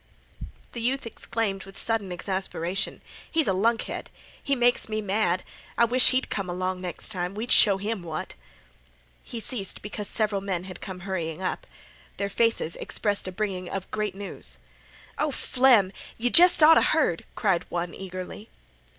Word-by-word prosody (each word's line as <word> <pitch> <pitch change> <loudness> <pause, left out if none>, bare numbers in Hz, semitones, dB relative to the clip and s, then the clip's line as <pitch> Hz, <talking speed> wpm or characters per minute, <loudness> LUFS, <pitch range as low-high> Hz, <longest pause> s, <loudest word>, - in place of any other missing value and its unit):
The 235 - -6
youth 260 +3 0
exclaimed 220 -3 -2
with 195 0 -12
sudden 225 -5 -1
exasperation: 190 +1 -2 0.3
"He's 320 -2 +2
a 190 - +3
lunkhead! 225 +5 0 0.3
He 280 - +1
makes 245 -2 +2
me 215 0 -1
mad. 195 -3 +1 0.3
I 235 - +6
wish 250 +2 +5
he'd 260 0 0
come 195 -3 -2
along 185 +1 -2
next 175 -3 -4
time. 180 -2 -3
We'd 230 +4 -3
show 200 -2 +6
'im 210 0 -2
what—" 160 -2 -5 0.9
He 235 - -6
ceased 215 -4 -3
because 210 0 -5
several 210 -2 0
men 190 -3 -2
had 185 -1 -9
come 185 -1 -7
hurrying 175 -2 -3
up. - - -2 0.5
Their 200 0 -1
faces 225 -6 +1
expressed 205 -2 -1
a - - -3
bringing 185 -2 -3
of 195 -1 -5
great 210 -3 -2
news. 200 0 -3 0.6
"O 305 - +2
Flem, 250 -8 +4 0.3
yeh 245 +2 +1
jest 350 -2 +7
oughta 320 +1 +9
heard!" 290 - +2
cried 190 -5 +1
one, 175 0 -2
eagerly. 185 +3 -7
200 Hz, 160 wpm, -26 LUFS, 185-230 Hz, 0.9 s, oughta